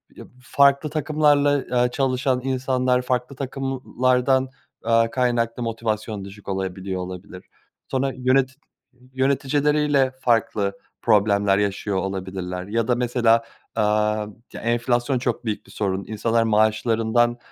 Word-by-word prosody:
yab - - -11
farklı 140 +3 +3
takımlarla, 145 -1 +2
eee, 125 0 +1
çalışan 130 -1 0
insanlar 130 -1 +1
farklı 125 +1 -2
takımlardan, 130 -1 0 0.4
eee, 115 0 +3
kaynaklı 120 -2 0
motivasyon 110 -3 -3
düşük 100 +1 -13
olabiliyor, 95 -1 -3
olabilir. 90 0 -8 0.5
Sonra 135 +1 0
yöneti 130 +1 +2 0.6
yöneticileriyle 140 +1 +2
farklı 105 -4 +1 0.2
problemler 100 -2 +3
yaşıyor 100 0 -1
olabilirler 95 -1 -4
ya 115 +2 -1
da 125 - +2
mesela, 120 -2 +2 0.3
aaa, 105 0 +1 0.3
ya, - - -7
enflasyon 120 +2 0
çok 120 -1 -2
büyük 110 -2 -3
bir - - -17
sorun, 95 -2 -2
insanlar 115 +2 +1
maaşlarından, 115 +2 +2
120 Hz, 115 wpm, -23 LUFS, 105-130 Hz, 0.6 s, farklı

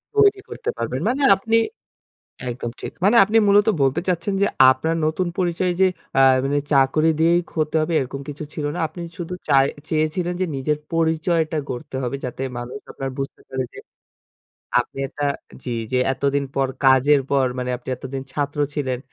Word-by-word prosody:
তৈরি 410 -2 +5
করতে 465 - -5
পারবেন, - - -2
মানে 270 +3 -1
আপনি 225 +4 +1 0.9
একদম 120 -1 -4
ঠিক। - - -5
মানে 210 +4 +5
আপনি 210 +3 +2
মূলত 205 +2 +5
বলতে 135 -1 +2
চাচ্ছেন 180 +2 0
যে 200 - +4 0.2
আপনার 160 +5 -1
নতুন 160 +4 0
পরিচয় 180 0 0
যে 190 - +7 0.3
আ - - +7 0.2
মানে 145 +1 +1
চাকরি 140 +3 +4
দিয়েই 170 +2 +4
ক - - -17
হতে 155 0 0
হবে 160 +2 -1
এরকম 135 +1 -4
কিছু 145 +1 -6
ছিল 150 - -3
না, - - -3
আপনি 165 +3 -10 0.2
শুধু 175 -1 -5 0.2
চায় 135 -1 +5 0.2
চেয়েছিলেন 160 +3 0
যে - - +3
নিজের 145 +3 0 0.2
পরিচয়টা 160 0 +1
গড়তে 125 +1 -6
হবে, 125 +2 -2
যাতে 125 +1 -6 0.2
মানুষ 120 +3 -6
আপনার 135 0 -4
বুঝতে 135 0 -5
পারে 130 -1 -2
যে, - - -13 1.0
আপনি - - -7
একটা 145 +2 -3 0.4
জি, 120 -2 -3 0.2
জি, - - +2 0.2
এতদিন 140 +1 0
পর 135 -1 +2 0.2
কাজের 135 +2 +5
পর 135 -2 +3
মানে 125 0 -2
আপনি 125 +1 -16
এতদিন 130 +1 -6
ছাত্র 145 0 -2 0.2
ছিলেন। 130 -4 -1
150 Hz, 175 wpm, -22 LUFS, 135-175 Hz, 1.0 s, যে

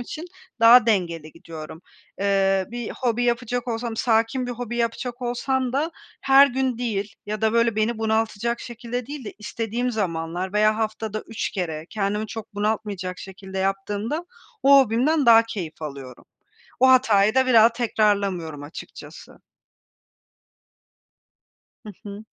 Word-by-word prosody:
için 305 +7 -7 0.4
daha 235 0 +8
dengeli 170 -7 -1
gidiyorum. 165 0 -10 0.4
Eee, 195 -1 +2
bir 240 -2 -5
hobi 245 -1 -1
yapacak 245 +1 -1
olsam, 230 0 -3
sakin 230 +2 +1
bir 245 - -3
hobi 240 0 -5
yapacak 240 +1 -3
olsam 250 +1 -1
da 300 +5 0 0.3
her 270 +1 +7
gün 260 -2 -1
değil 210 -4 -3
ya 215 0 -4
da, 220 0 +2
böyle, 230 -1 +2
beni 220 +1 0
bunaltacak 225 +1 -1
şekilde 240 0 -6
değil 285 -3 -7
de - - -7
istediğim 230 +3 -3
zamanlar 180 -3 -3
veya 215 +1 +3
haftada 215 -1 -3
3 225 - -3
kere 165 -6 -4
kendimi 210 +1 -2
çok 215 -2 -8
bunaltmayacak 205 -3 -2
şekilde 190 0 -8
yaptığımda 205 - -2 0.4
o 275 0 +7
hobimden 265 +4 +2
daha 230 -1 +8
keyif 175 -9 -7
alıyorum. 135 -4 -8 0.6
O 260 0 +6
hatayı 220 -4 +4
da 260 0 +4
bir 255 - +1
daha 225 +1 +7
tekrarlamıyorum, 200 -9 0
açıkçası. 145 +4 -11 2.5
Hı - - -7
hı. 205 +1 -8
220 Hz, 135 wpm, -23 LUFS, 195-240 Hz, 2.5 s, daha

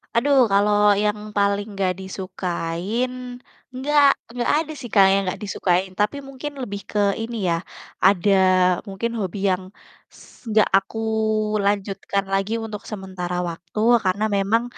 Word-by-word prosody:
Aduh, 275 +4 +3 0.2
kalau 205 +1 +4 0.3
yang 210 0 0 0.2
paling 200 +1 +1
gak 185 -1 +2
disukain, 185 +3 -3 0.8
gak 290 -1 +5 0.3
gak 240 - 0
ada 315 0 -2
sih, 245 -3 -8
Kak, 195 -2 +7
yang 195 - +3
gak 180 - -6
disukain. 185 -2 0
Tapi 210 +7 +1
mungkin 275 +2 -6
lebih 200 -5 -5
ke 210 - -1 0.2
ini 230 +1 -5
ya. 170 - +2 0.5
ada 200 +1 +3 0.6
mungkin 195 +5 -3
hobi 195 -1 -3
yang 185 0 -1 0.5
s - - -16 0.4
gak 215 - +6
aku 195 +3 -11 0.7
lanjutkan 200 0 -1
lagi 195 +3 0
untuk 210 -2 -6
sementara 185 -3 -5
waktu, 170 +4 -7 0.3
karena 190 +3 +1
memang 210 +4 +2
200 Hz, 140 wpm, -22 LUFS, 190-225 Hz, 0.8 s, Kak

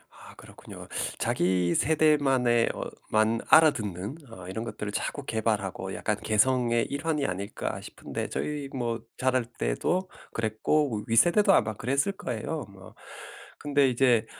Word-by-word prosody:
아 - - -14
그렇군요. - - -12 0.3
자기 90 -1 +1
세대만의 135 -5 +3
어 - - -5 0.3
만 110 +1 +2
알아듣는 130 - +3
어 90 -4 -10
이런 110 +4 -4
것들을 105 -2 -5
자꾸 145 +6 -3
개발하고 105 -4 -2
약간 105 -1 -1
'개성의 120 +1 +2
일환이 145 0 -1
아닐까?' 100 0 -4
싶은데 - - -6
저희 145 -2 -3
뭐 120 -3 -2 0.2
자랄 130 -2 +1
때도 120 - -1 0.2
그랬고 110 +1 0
윗세대도 175 - +5
아마 110 -1 +3
그랬을 140 - 0
거예요 155 - -4
뭐. 95 -2 -14 0.6
근데 145 -2 +2
이제 120 -2 +3
120 Hz, 290 characters per minute, -27 LUFS, 105-145 Hz, 0.6 s, 윗세대도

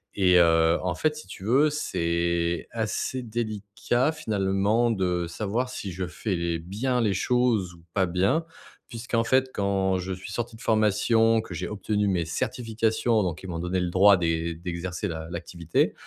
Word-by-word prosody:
et 90 -2 +4
heu, 80 0 +4
en 90 -2 -1
fait, 155 +9 0
si 155 - -10
tu 95 - -10
veux, 135 +8 +4
c'est 85 - -1
assez 115 +3 -2
délicat 115 +3 -1
finalement 105 -4 +1
de 90 -5 0
savoir 110 +8 -2
si 100 -6 -5
je 90 +1 -4
fais 95 +3 -3
les 85 -1 -1
bien 105 +10 -2
les 110 -4 +2
choses 115 -3 +1
ou 85 - -19
pas 95 -2 +2
bien. 95 - +1 0.5
Puisqu'en 115 0 -1
fait, 130 +1 +2
quand 95 -1 +1
je 95 +1 -4
suis 95 +2 -8
sorti 120 +2 -4
de 110 - -14
formation, 110 0 +3
que 95 - -9
j'ai 90 +1 -4
obtenu 105 0 -1
mes 90 -3 +1
certifications, 110 - 0
donc 90 -3 -3
ils - - -7
m'ont 85 -2 -4
donné 90 +2 -1
le 90 - -1
droit 100 +3 +6
d'é 85 -1 -1
d'exercer 90 +3 -4
l'a 80 -1 -5
l'activité 85 -1 -1
100 Hz, 170 wpm, -26 LUFS, 90-115 Hz, 0.5 s, droit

